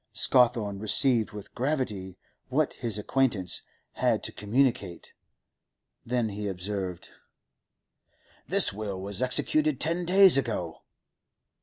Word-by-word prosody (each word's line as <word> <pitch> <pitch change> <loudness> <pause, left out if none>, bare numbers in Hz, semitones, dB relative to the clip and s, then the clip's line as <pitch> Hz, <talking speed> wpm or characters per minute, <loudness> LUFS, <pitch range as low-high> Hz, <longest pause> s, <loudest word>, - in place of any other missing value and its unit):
Scawthorne 115 -5 +2
received 110 +2 +1
with 105 -2 -11
gravity 120 -9 -3 0.3
what - - 0
his 110 -2 -1
acquaintance 105 -4 0 0.3
had - - 0
to - - -2
communicate. 105 -4 -1 0.9
Then 120 -2 -1
he 105 0 -5
observed: 95 -1 -5 1.4
'The - - +3
will 100 -2 -5
was 100 +2 -3
executed 300 - +2
ten 170 +2 0
days 190 -2 +7
ago. 105 -11 -3
110 Hz, 105 wpm, -27 LUFS, 100-130 Hz, 1.4 s, days